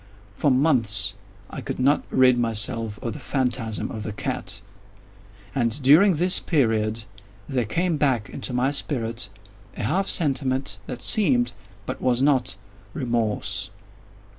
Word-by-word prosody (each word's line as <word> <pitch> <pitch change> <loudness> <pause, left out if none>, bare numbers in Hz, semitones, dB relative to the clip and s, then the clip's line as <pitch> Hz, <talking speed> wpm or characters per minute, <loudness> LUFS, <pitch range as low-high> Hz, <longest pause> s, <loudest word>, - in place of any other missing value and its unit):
For 145 - +2
months 120 -8 +3 0.4
I - - -6
could - - -5
not 140 +3 +3
rid 130 -1 +5
myself 115 -1 -1
of 115 - -3
the - - -8
phantasm 125 -5 -1
of 110 - -5
the 105 - -5
cat; 100 -1 -3 0.9
and, 120 -2 0
during 160 +8 +6
this 180 +4 +3
period, 110 -7 +1 0.4
there 125 -3 0
came 170 - 0
back 130 -8 +1
into - - -6
my 125 +2 +1
spirit 115 -7 -2 0.5
a - - -3
half 190 - 0
sentiment 135 - 0
that 125 - -6
seemed, 125 - +3 0.3
but - - -5
was 125 0 +2
not, 130 -8 +2 0.4
remorse. 115 -5 -1
125 Hz, 135 wpm, -24 LUFS, 115-140 Hz, 0.9 s, during